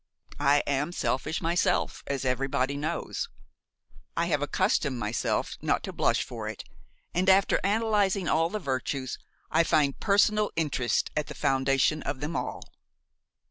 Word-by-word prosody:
I 145 0 +4
am 145 +4 0
selfish 160 +2 -1
myself, 170 +2 +1
as 135 -1 -2
everybody 130 +1 0
knows. 150 +2 -3 0.9
I 170 - +2
have 150 -4 0
accustomed 145 - +1
myself 110 0 -1
not - - 0
to - - -5
blush - - +2
for - - -6
it, - - -7 0.5
and, 185 +2 +2
after 190 +1 +5
analyzing 205 -2 +1
all 165 +2 +2
the 215 - -3
virtues, 130 -5 -3 0.3
I 165 +1 +4
find 145 -4 +2
personal 210 +1 +3
interest 145 -6 0
at 150 -1 -1
the - - -8
foundation 135 +3 +2
of 130 - -4
them 150 +4 -4
all. - - -3
150 Hz, 140 wpm, -28 LUFS, 135-185 Hz, 0.9 s, after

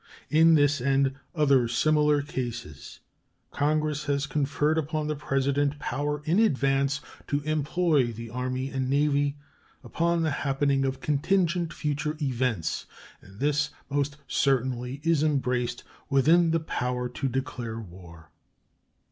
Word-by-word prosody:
In 160 +1 +6
this 145 -3 +3
and 135 +1 +2 0.2
other 140 -6 +4
similar 150 +4 +2
cases 120 - -6 0.5
Congress 150 0 0
have 140 -1 -1
conferred 145 +3 +1
upon 155 0 -2
the 150 0 -1
President 140 0 0
power 145 +2 -3
in 170 +6 +2
advance 140 -7 +2 0.3
to 145 0 0
employ 155 -2 +1
the 115 0 -8
Army 130 +2 -3
and 130 -1 -2
Navy 145 0 +1 0.5
upon 170 +7 0
the 155 - +1
happening 140 -1 +1
of 135 0 -3
contingent 170 +3 +1
future 150 +1 -2
events; 125 - -1 0.3
and 95 +2 -16
this 150 +1 +1 0.2
most 140 0 -1
certainly 130 0 0
is 165 -3 +2
embraced 125 -5 0 0.3
within 160 +5 +4
the 165 0 +2
power 125 -5 -2
to 125 +3 -3
declare 125 -3 -4
war. 85 -5 -12
140 Hz, 125 wpm, -27 LUFS, 130-150 Hz, 0.5 s, In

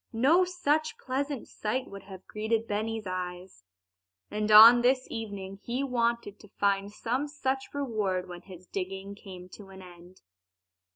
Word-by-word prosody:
No 275 +11 +4
such 310 -4 0
pleasant 275 0 -3
sight 250 +5 -3
would 200 0 -9
have 190 -1 -12
greeted 220 +1 -2
Benny's 220 +1 -3
eyes. 180 - -6 0.7
And 210 0 -2
on 225 +3 +10
this 255 +1 +2
evening 200 -3 -6
he 245 +5 -3
wanted 235 -5 -1
to 210 - -15
find 200 0 +1
some 250 +7 -2
such 270 -2 -3
reward 210 -10 -2
when 175 -1 -9
his 185 -1 -13
digging 195 +1 -5
came 185 -3 -11
to 195 +1 -13
an 190 0 -12
end. 175 +1 -15
210 Hz, 150 wpm, -29 LUFS, 190-250 Hz, 0.7 s, on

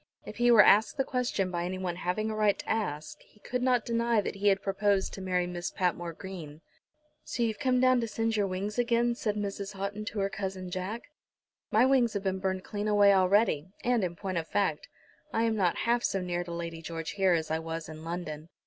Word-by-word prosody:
If - - -9
he 240 0 +3
were 225 -3 +8
asked 215 +8 +5
the 270 - +2
question 245 -8 -1
by 175 -1 -2
anyone 180 -1 -3
having 215 +5 -1
a - - -3
right 210 -2 +2
to - - -9
ask 155 -9 -2
he 210 - -24
could 250 0 -3
not 250 -2 +2
deny 235 -1 +1
that 205 - -2
he 205 +1 0
had 195 -1 +3
proposed 195 0 +1
to 195 - -7
marry 180 -1 0
Miss 175 0 -4
Patmore 175 -2 -1
Green. 165 -5 -9 0.6
"So 240 - -2
you've 220 -2 -1
come 255 -1 +2
down 255 -1 +4
to 230 - -2
singe 225 +1 -1
your 205 -2 +1
wings 200 +4 -3
again?" 235 0 +2
said 215 -3 -2
Mrs. 200 -1 -4
Houghton 200 +2 -4
to 225 - -5
her 195 0 +1
cousin 190 -2 -5
Jack. 185 +6 -4 0.7
"My - - +4
wings 260 -4 +3
have 200 -2 -3
been 190 -1 -1
burned 190 -1 -2
clean 205 0 -4
away 205 -1 +5
already, 190 -4 +3 0.2
and, 240 -3 +2
in 175 -1 -2
point 185 -1 -2
of 165 - -6
fact, 195 -7 0 0.4
I 225 - +1
am 225 -1 +1
not 185 -5 +2
half 240 +1 +2
so 195 - 0
near 175 -1 -2
to 170 - -7
Lady 170 -1 -5
George 165 -1 -5
here 190 -2 +2
as 160 -2 -1
I 160 - +1
was 165 0 -5
in 155 0 -9
London." 165 -2 -5
195 Hz, 225 wpm, -29 LUFS, 175-220 Hz, 0.7 s, were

